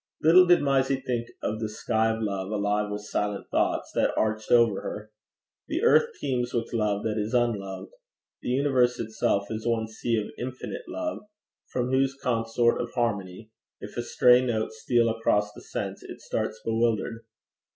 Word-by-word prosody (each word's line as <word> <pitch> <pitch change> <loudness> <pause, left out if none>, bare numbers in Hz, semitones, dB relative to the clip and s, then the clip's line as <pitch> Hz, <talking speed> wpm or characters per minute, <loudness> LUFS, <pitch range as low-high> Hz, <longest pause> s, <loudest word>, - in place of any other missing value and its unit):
Little 180 +4 +7
did 175 -3 +5
Mysie 135 -1 +2
think 120 -2 -1 0.2
of 110 +1 -2
the 110 -1 -2
sky 110 +1 0
of 110 0 -2
love, 100 -2 -2
alive 105 0 0
with 105 0 -5
silent 105 -1 -3
thoughts, - - 0
that - - +1
arched 110 0 0
over 115 -4 +4
her. 105 +1 -6 0.6
The - - -2
earth 470 0 +5
teems 125 -2 -1
with 115 0 -2
love 105 -3 0
that 110 -1 -1
is 105 +4 -2
unloved. 105 - -1 0.5
The - - -4
universe 130 -2 +2
itself 105 -2 -1
is 110 +1 -4
one 115 -1 0
sea 110 +1 -2
of 105 - -3
infinite 130 - -6
love, 320 -2 -3 0.5
from 125 0 -2
whose 135 +1 +1
consort 120 -1 +1
of 120 -1 -5
harmonies 105 -3 -2 0.3
if - - -9
a 120 - -1
stray 125 +1 +5
note 110 -3 -1
steal 115 +2 +1
across 105 -2 +1
the - - -12
sense, - - -5
it - - -10
starts - - -3
bewildered. 115 0 0
115 Hz, 170 wpm, -27 LUFS, 105-125 Hz, 0.6 s, Little